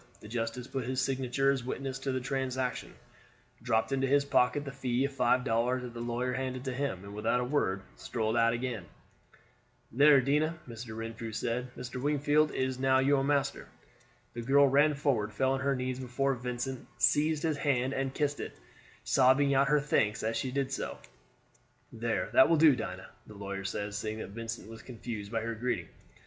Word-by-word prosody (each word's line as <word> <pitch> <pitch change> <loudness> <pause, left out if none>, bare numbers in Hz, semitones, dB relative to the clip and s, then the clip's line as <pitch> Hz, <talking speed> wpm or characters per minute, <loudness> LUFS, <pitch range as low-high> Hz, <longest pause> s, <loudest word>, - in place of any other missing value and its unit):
The - - -12
justice 115 +2 -3
put 135 0 -4
his 130 0 -1
signature 135 0 +1
as 135 -3 -2
witness 135 +1 -4
to 135 0 -2
the 130 - -1
transaction, 130 -1 -3 0.7
dropped 115 +1 +1
into 135 0 +1
his 140 +1 +3
pocket 140 +1 +2
the 140 - -5
fee 130 -1 0
of 140 - -3
five 125 -1 +2
dollars 125 +1 +1
that 125 -1 -7
the 120 - -7
lawyer 120 +2 -2
handed 130 0 -3
to 130 - -2
him, 125 -8 -3
and 100 0 -9
without 110 +4 0
a - - 0
word 110 -8 0
strolled 110 -1 -2
out 115 0 +4
again. 115 -5 -3 1.1
"There, 140 +3 +6
Dinah," 150 +5 +1
Mr. 115 -1 -8
Renfrew 115 0 -5
said, 120 +3 -2
"Mr. 125 0 -6
Wingfield 150 +1 +2
is 130 -2 -2
now 130 0 +4
your 135 +1 +3
master." 140 -1 0 0.7
The 120 - -5
girl 140 +4 +5
ran 145 +3 +4
forward, 130 -7 0
fell 130 +5 +1
on 135 - 0
her 140 +1 +1
knees 130 0 -3
before 130 +2 0
Vincent, 125 +1 -4
seized 150 +5 +2
his 160 -3 0
hand 135 -2 +1
and 135 0 -1
kissed 145 0 -1
it, - - -6 0.5
sobbing 140 +2 +4
out 135 +1 +4
her 150 +1 +4
thanks 110 -8 +1
as 110 +1 -1
she 120 +3 -1
did 135 0 -1
so. - - -3 1.0
"There, 115 0 -2
that 220 - +7
will 165 - +4
do, 155 -3 +7
Dinah," 95 -5 -6 0.2
the 105 - -12
lawyer 100 -1 -5
said, 100 +1 -3
seeing 110 +1 -3
that 110 - -6
Vincent 115 0 -6
was 115 0 -10
confused 115 -4 -7
by 115 -1 -1
her 115 +1 -3
greeting. 115 -5 -2
125 Hz, 190 wpm, -30 LUFS, 115-135 Hz, 1.1 s, that